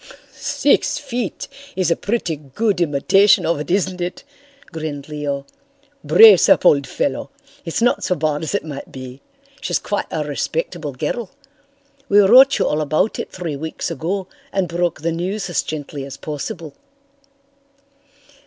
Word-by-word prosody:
"Six -, -, +1 dB
feet 250 Hz, -8 st, -4 dB, 0.3 s
is 180 Hz, -3 st, +1 dB
a -, -, +4 dB
pretty 205 Hz, -7 st, -2 dB
good 175 Hz, -, -2 dB
imitation 170 Hz, +6 st, +4 dB
of 165 Hz, -2 st, 0 dB
it, 150 Hz, -, -6 dB
isn't 185 Hz, -1 st, 0 dB
it?" 175 Hz, +1 st, -4 dB, 0.5 s
grinned 155 Hz, -4 st, -5 dB
Leo. 145 Hz, -2 st, -4 dB, 0.6 s
"Brace 215 Hz, -6 st, +7 dB
up, -, -, +4 dB
old 140 Hz, -2 st, +5 dB
fellow. -, -, -2 dB, 0.4 s
It's 165 Hz, +7 st, -1 dB
not 245 Hz, -, +2 dB
so 180 Hz, -, +1 dB
bad 150 Hz, -1 st, -1 dB
as 160 Hz, +5 st, -2 dB
it 200 Hz, -, -2 dB
might 145 Hz, -3 st, -8 dB
be. 130 Hz, 0 st, -9 dB, 0.4 s
She's -, -, 0 dB
quite 205 Hz, -, -3 dB
a 155 Hz, -, -2 dB
respectable 150 Hz, +1 st, -3 dB
girl. 170 Hz, -, -3 dB, 0.8 s
We 205 Hz, -, +4 dB
wrote 255 Hz, +7 st, +7 dB
you -, -, +1 dB
all 150 Hz, -, 0 dB
about 155 Hz, +8 st, 0 dB
it -, -, -5 dB
three 170 Hz, -5 st, -4 dB
weeks 160 Hz, +3 st, -4 dB
ago 190 Hz, +4 st, -3 dB, 0.3 s
and 195 Hz, -2 st, 0 dB
broke 170 Hz, -2 st, -1 dB
the 165 Hz, +1 st, 0 dB
news 180 Hz, +3 st, -3 dB
as -, -, +1 dB
gently 145 Hz, -2 st, -6 dB
as 135 Hz, 0 st, -8 dB
possible." 150 Hz, 0 st, -6 dB
165 Hz, 155 wpm, -20 LUFS, 150-195 Hz, 0.8 s, Brace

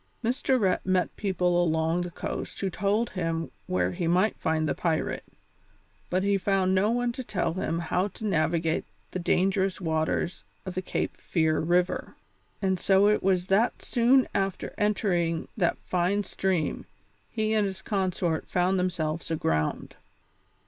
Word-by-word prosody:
Mr. 255 Hz, +2 st, +1 dB
Rhett 190 Hz, -4 st, +1 dB
met 185 Hz, -1 st, +1 dB
people 185 Hz, -3 st, 0 dB
enough 170 Hz, -, +2 dB
along 160 Hz, +2 st, +1 dB
the 175 Hz, -, -3 dB
coast -, -, -5 dB
who 195 Hz, -1 st, -1 dB
told 205 Hz, +5 st, 0 dB
him 165 Hz, -3 st, -2 dB, 0.2 s
where 185 Hz, 0 st, +1 dB
he 175 Hz, -2 st, -2 dB
might 185 Hz, +6 st, +3 dB
find 160 Hz, 0 st, 0 dB
the -, -, +1 dB
pirate, 165 Hz, -3 st, -1 dB, 0.9 s
but 185 Hz, +1 st, +1 dB
he 200 Hz, 0 st, +2 dB
found 190 Hz, -1 st, +2 dB
no 190 Hz, +3 st, +3 dB
one 245 Hz, +1 st, +1 dB
to 255 Hz, +2 st, -6 dB
tell 165 Hz, -, -1 dB
him 165 Hz, -2 st, -2 dB
how 180 Hz, +3 st, 0 dB
to 210 Hz, +2 st, -8 dB
navigate 165 Hz, -3 st, +1 dB, 0.3 s
the 185 Hz, -, -3 dB
dangerous 190 Hz, +2 st, +1 dB
waters 160 Hz, +1 st, -1 dB, 0.2 s
of 185 Hz, -, -4 dB
the 185 Hz, -, -2 dB
Cape 185 Hz, -, -2 dB
Fear 160 Hz, -2 st, +1 dB
River, 175 Hz, +3 st, 0 dB, 0.5 s
and 190 Hz, -1 st, +1 dB
so 195 Hz, +2 st, +4 dB
it 210 Hz, -, +2 dB
was 185 Hz, -2 st, +2 dB
that 200 Hz, +6 st, +2 dB
soon 250 Hz, +2 st, +4 dB
after 195 Hz, -1 st, -2 dB
entering 180 Hz, -6 st, 0 dB
that 175 Hz, -6 st, +1 dB
fine 185 Hz, +3 st, +1 dB
stream 185 Hz, -4 st, -1 dB, 0.4 s
he 220 Hz, -1 st, -1 dB
and 210 Hz, -2 st, +2 dB
his 190 Hz, -1 st, -7 dB
consort 185 Hz, -5 st, -1 dB
found 185 Hz, +1 st, +2 dB
themselves 165 Hz, -3 st, -2 dB
aground. 80 Hz, -, -1 dB
185 Hz, 155 wpm, -27 LUFS, 170-200 Hz, 0.9 s, so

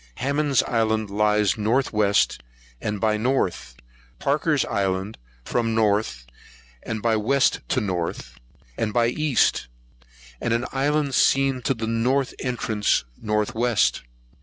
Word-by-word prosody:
Hammond's 140 Hz, 0 st, +1 dB
Island 110 Hz, -3 st, 0 dB
lies 105 Hz, 0 st, +2 dB
north 120 Hz, +5 st, +1 dB
west 105 Hz, -, +2 dB, 0.4 s
and 105 Hz, -1 st, -3 dB
by 110 Hz, 0 st, +1 dB
west, 90 Hz, -, -2 dB, 0.3 s
Parker's 145 Hz, 0 st, +1 dB
Island 100 Hz, -1 st, -2 dB, 0.3 s
from 115 Hz, -2 st, -1 dB
north 105 Hz, -, 0 dB, 0.6 s
and 110 Hz, -2 st, -5 dB
by 115 Hz, -1 st, +2 dB
west 130 Hz, +6 st, +2 dB
to -, -, +1 dB
north 85 Hz, -, -4 dB, 0.4 s
and 105 Hz, -2 st, -1 dB
by 120 Hz, 0 st, +3 dB
east, 150 Hz, -, +1 dB, 0.7 s
and 120 Hz, -1 st, +1 dB
an 120 Hz, +2 st, -1 dB
island 145 Hz, +1 st, 0 dB
seen 135 Hz, 0 st, +3 dB
to 135 Hz, -, 0 dB
the 115 Hz, -1 st, -4 dB
north 125 Hz, +4 st, 0 dB
entrance 115 Hz, -4 st, 0 dB, 0.2 s
north 105 Hz, -1 st, -1 dB
west. 110 Hz, -, +1 dB
110 Hz, 125 wpm, -23 LUFS, 105-130 Hz, 0.7 s, by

